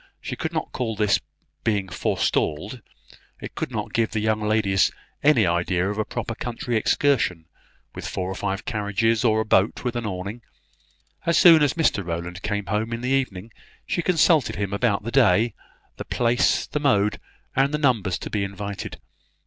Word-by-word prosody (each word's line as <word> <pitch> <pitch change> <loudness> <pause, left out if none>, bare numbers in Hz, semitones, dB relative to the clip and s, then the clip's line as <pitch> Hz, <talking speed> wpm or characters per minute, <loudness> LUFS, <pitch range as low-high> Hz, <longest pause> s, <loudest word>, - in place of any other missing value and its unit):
She - - -5
could - - -3
not - - -3
call 115 -3 -2
this 105 -1 +2 0.4
being 100 -3 0
forestalled; 90 +4 -1 0.6
it - - -8
could - - -3
not - - -4
give 115 -1 +1
the 110 - -2
young 110 0 0
ladies 105 -3 +2 0.3
any 140 -7 +5
idea 90 +2 0
of 105 - -5
a 110 - 0
proper 115 - -4
country 120 +1 -4
excursion, 110 - +1 0.5
with - - -6
four 90 - -3
or 95 - -3
five 95 +1 -3
carriages, 110 0 0
or 110 -2 +3
a - - -3
boat 100 0 +2
with 125 -1 -2
an 120 -2 -2
awning. 100 +4 -5 0.9
As 170 0 +3
soon 165 -1 +8
as 145 -2 +2
Mr 155 -11 +1
Rowland 85 +1 -5
came 105 +1 -2
home 110 +3 -1
in 115 - -4
the 125 - -2
evening, 115 -6 -1 0.3
she 175 - -1
consulted 165 -6 +3
him 100 -1 -3
about 100 -1 +1
the 115 - -4
day, 115 -3 +4 0.4
the - - -6
place, 120 +2 +2
the 150 - -3
mode, 105 -7 +2 0.4
and 135 +1 +3
the 150 - 0
numbers 115 - +1
to - - -6
be 105 -2 0
invited. 100 0 -6
110 Hz, 180 wpm, -24 LUFS, 100-125 Hz, 0.9 s, soon